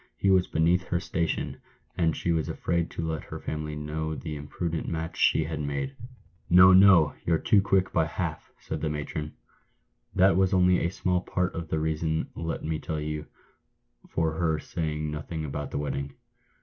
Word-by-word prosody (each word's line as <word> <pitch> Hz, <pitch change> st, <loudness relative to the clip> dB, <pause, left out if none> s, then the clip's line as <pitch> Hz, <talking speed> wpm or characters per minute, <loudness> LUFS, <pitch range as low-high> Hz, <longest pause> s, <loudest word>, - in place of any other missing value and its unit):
"He 100 Hz, -, +2 dB
was 95 Hz, -1 st, +4 dB
beneath 85 Hz, +4 st, +2 dB
her 85 Hz, -, -1 dB
station, 85 Hz, -2 st, -2 dB, 0.3 s
and 80 Hz, -3 st, +1 dB
she 85 Hz, -, 0 dB
was 80 Hz, -2 st, 0 dB
afraid 85 Hz, -1 st, -1 dB
to 80 Hz, -, -4 dB
let 80 Hz, -1 st, -3 dB
her -, -, -7 dB
family 75 Hz, -1 st, -4 dB
know 80 Hz, +1 st, -3 dB
the 80 Hz, -1 st, -5 dB
imprudent 80 Hz, +3 st, -4 dB
match 80 Hz, 0 st, -3 dB
she 80 Hz, -, +3 dB
had 80 Hz, 0 st, -4 dB
made." 70 Hz, -, -3 dB, 0.3 s
" 90 Hz, -, -34 dB
No, 90 Hz, +2 st, +8 dB
no! 95 Hz, -6 st, +7 dB
you're 85 Hz, -1 st, +2 dB
too 100 Hz, +5 st, +4 dB
quick 95 Hz, -1 st, +1 dB
by 80 Hz, -2 st, +2 dB
half," 85 Hz, -2 st, -4 dB
said -, -, -5 dB
the 80 Hz, -, 0 dB
matron. 75 Hz, 0 st, -4 dB, 0.4 s
" -, -, -38 dB
That 95 Hz, +1 st, +5 dB
was 95 Hz, 0 st, +3 dB
only 90 Hz, -1 st, +4 dB
a 85 Hz, -, +1 dB
small 90 Hz, -1 st, 0 dB
part 90 Hz, 0 st, -1 dB
of 85 Hz, -1 st, -5 dB
the 80 Hz, -, -1 dB
reason, 80 Hz, 0 st, -1 dB
let 80 Hz, 0 st, -4 dB
me 80 Hz, 0 st, -1 dB
tell 80 Hz, -1 st, -4 dB
you, 75 Hz, 0 st, -4 dB, 0.8 s
for 80 Hz, -1 st, 0 dB
her 80 Hz, -3 st, +2 dB
saying 75 Hz, -1 st, -3 dB
no 75 Hz, 0 st, -4 dB
thing 80 Hz, 0 st, -5 dB
about 75 Hz, 0 st, -4 dB
the -, -, -4 dB
wedding. 70 Hz, -1 st, -3 dB
80 Hz, 190 wpm, -27 LUFS, 75-90 Hz, 0.8 s, No